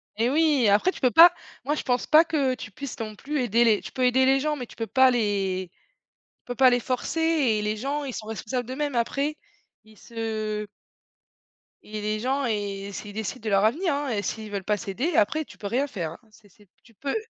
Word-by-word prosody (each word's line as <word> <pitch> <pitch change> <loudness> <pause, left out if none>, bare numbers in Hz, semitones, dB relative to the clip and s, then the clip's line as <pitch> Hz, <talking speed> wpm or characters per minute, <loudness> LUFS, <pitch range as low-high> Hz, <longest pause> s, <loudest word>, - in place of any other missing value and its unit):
Et 230 +3 +1
oui! 295 -2 +3
Et - - +5
après, 210 - +3
tu - - -11
peux 255 -2 +3
pas. 335 +4 +9 0.3
Moi, 295 +2 0
je - - -4
pense 250 -2 0
pas 315 +2 +7
que 280 -6 0
tu 225 -3 -9
puisses 275 +4 -8
non 215 -1 -5
plus 290 +6 -4
aider 235 0 +3
les 220 -3 +3
tu - - -9
peux 255 -1 0
aider 260 +1 +4
les 270 +1 +4
gens, 300 +1 -1
mais 250 - -6
tu - - -16
peux 225 - -4
pas 260 +1 +5
les 195 -5 -1 0.6
tu - - -62
peux 245 - -5
pas 260 +1 +6
les 245 0 +2
forcer 255 +6 -3
et 285 -10 +2
les 210 +1 -2
gens, 285 +5 -3
ils 265 -3 -5
sont 215 - -6
responsables 235 +2 -4
d'eux-mêmes, 280 +1 -3
après, 275 +6 -1 0.5
ils 215 0 -20
se 215 -2 -4 1.2
et 215 0 -7
les 215 +1 -2
gens 265 +4 -1
et 200 -3 -3
c'est 210 - -7
ils 205 - -10
décident 220 +2 -5
de 220 - -2
leur 195 0 +3
avenir, 315 - +1
hein, 285 0 -2
et 215 -4 -1
s'ils 215 +1 -5
veulent 200 -2 -3
pas 210 +1 0
s'aider, 235 - -3
après 310 +9 +2
tu - - -15
peux 205 - -5
rien 260 +7 0
faire, 175 - -4
hein. - - -14
C'est 210 -1 -21
c'est 205 +2 -23 0.2
tu 230 - -21
peux 275 +6 -4
240 Hz, 240 wpm, -25 LUFS, 210-275 Hz, 1.2 s, pas